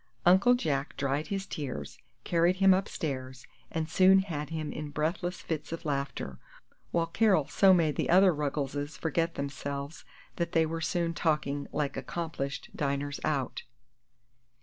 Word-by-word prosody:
Uncle 195 +8 +6
Jack 145 - -2
dried 140 +2 -1
his 195 -2 -3
tears, 130 - -6 0.2
carried 170 +1 +3
him 190 0 +6
upstairs, 135 -8 -3 0.2
and 160 -1 -2
soon 190 +4 +6
had 165 -6 -2
him 155 -2 -3
in 150 -1 -5
breathless 165 +4 -2
fits 155 -2 -4
of 165 0 -5
laughter, 140 - -3 0.5
while 170 -1 +1
Carol 185 -3 +3
so 195 -1 +5
made 165 -5 +3
the - - 0
other 185 +1 +6
Ruggleses 145 0 -3
forget 165 +1 -1
themselves 140 +1 -5 0.3
that 170 -1 -2
they 165 -1 +4
were 165 +1 -3
soon 170 +1 0
talking 150 -4 0
like 145 -2 -1
accomplished 140 0 -4
diners 145 0 -2
out. 140 -5 -1
155 Hz, 145 wpm, -30 LUFS, 140-175 Hz, 0.5 s, Uncle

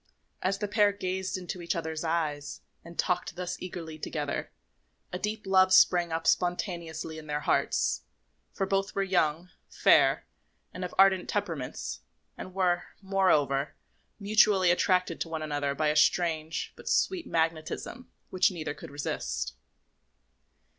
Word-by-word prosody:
As 190 +2 0
the 210 +1 -2
pair 205 0 +4
gazed 190 -1 -3
into 180 0 -6
each 170 - -2
other's 160 -1 -3
eyes 155 -3 -2 0.2
and 170 0 -12
talked 180 -2 -1
thus 180 0 -4
eagerly 165 -3 -7
together, 150 -2 -3 0.6
a 180 - -2
deep 210 +2 -3
love 190 -1 +4
sprang 175 -2 +5
up 165 0 -2
spontaneously 170 -3 -1
in 155 - -12
their 150 0 -2
hearts; - - +1 0.5
for 195 - -2
both 195 0 -1
were 195 - +1
young, 175 -2 0 0.2
fair, - - +4 0.5
and 180 - -6
of 180 - -5
ardent 190 -1 +5
temperaments, 165 -11 -3 0.4
and 185 0 -9
were, 180 -2 +1 0.2
moreover, 150 -8 +2 0.4
mutually 200 -3 +4
attracted 180 -1 +1
to 165 - -2
one 160 -1 -3
another 145 -2 -1
by 155 +1 +1
a 150 - 0
strange, 160 0 +1
but - - -7
sweet 370 -3 +1
magnetism 165 +9 -2 0.2
which 185 +3 +4
neither 160 -6 -4
could 145 - -11
resist. 145 +1 -3
175 Hz, 140 wpm, -29 LUFS, 160-190 Hz, 0.6 s, sprang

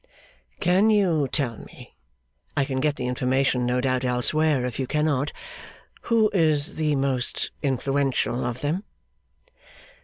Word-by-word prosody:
'Can 190 +5 +3
you 180 -9 +2
tell 125 -5 -1
me - - -14 0.6
I 140 - +2
can 135 -1 -3
get 145 +1 +1
the 125 - -4
information, 125 0 0
no 125 +1 +1
doubt, 130 0 0
elsewhere, 130 +3 +1
if 125 0 -5
you 130 - -2
cannot 150 -1 0 0.8
who 225 -2 +3
is 155 -5 +3
the 155 -2 +1
most 135 -2 -1
influential 135 -2 0
of 120 +1 -4
them? 160 +7 -1
140 Hz, 130 wpm, -24 LUFS, 125-155 Hz, 0.8 s, Can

